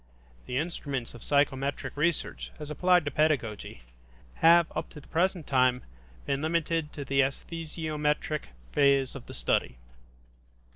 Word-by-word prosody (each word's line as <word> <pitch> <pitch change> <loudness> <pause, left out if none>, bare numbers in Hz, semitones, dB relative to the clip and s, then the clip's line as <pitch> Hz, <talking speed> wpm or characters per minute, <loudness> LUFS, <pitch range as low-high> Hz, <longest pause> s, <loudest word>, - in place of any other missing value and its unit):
The 125 - -2
instruments 140 -5 -3
of 120 - -11
psychometric 140 -1 0
research, 165 +3 -1
as 150 -1 -7
applied 180 +2 +3
to 145 - -1
pedagogy, 130 - 0 0.5
have 170 +1 +7
up - - -3
to 150 - -11
the - - -17
present 175 -1 0
time 125 -2 +2 0.4
been 140 0 -1
limited 165 -1 0
to 140 - -6
the 135 +1 0
esthesiometric 150 +1 -1 0.3
phase 140 -2 +3
of 135 - -9
the - - -9
study. - - 0
150 Hz, 135 wpm, -29 LUFS, 135-160 Hz, 0.5 s, have